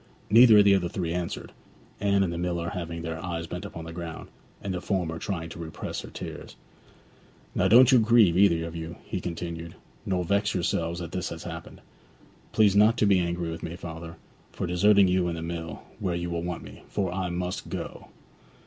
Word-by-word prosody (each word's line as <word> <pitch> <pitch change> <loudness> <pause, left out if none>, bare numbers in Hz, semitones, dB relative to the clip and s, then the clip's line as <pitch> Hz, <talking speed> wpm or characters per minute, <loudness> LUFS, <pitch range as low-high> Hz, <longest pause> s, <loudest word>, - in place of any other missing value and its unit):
Neither 115 0 +9
of 105 - +7
the 100 - +7
other 90 -3 +1
three 85 -2 -2
answered, 90 -1 -4 0.5
Anne 100 -1 +3
and 85 -3 -1
the - - -4
miller 85 -1 -1
having 85 -1 -5
their 80 0 -5
eyes 85 -2 -3
bent 90 +4 -6
upon 85 -5 -7
the 80 - -8
ground, 85 -1 -7 0.3
and 100 - -4
the 90 - -3
former 85 -5 -1
trying 85 -4 -3
to 85 - -9
repress 80 -1 -5
her - - -10
tears. - - -8 1.0
'Now - - +2
don't 125 +3 +7
you 130 - +7
grieve, 110 -6 +5
either 85 -4 +4
of 85 0 -7
you,' 80 +1 -6
he 95 - -4
continued; 85 -1 -5 0.3
'nor 90 -2 0
vex 100 +3 +1
yourselves 85 -1 -1
that 85 -1 -6
this 90 -2 -3
has 80 0 -7
happened. 80 -2 -8 0.7
Please 105 -3 +4
not 105 +3 +5
to 110 - +3
be 100 -2 +5
angry 85 -1 -2
with 80 - -6
me, 85 +1 -5
father, 80 -1 -8 0.4
for - - -4
deserting 100 +3 +5
you 90 -1 +2
and 85 -1 -2
the 80 - -5
mill, 85 -1 -5 0.2
where 90 -4 -1
you 85 0 -3
want 85 0 -3
me, - - -12
for 95 -3 -2
I 95 -1 -2
must 90 +1 -3
go. - - -6
85 Hz, 200 wpm, -27 LUFS, 85-95 Hz, 1.0 s, Neither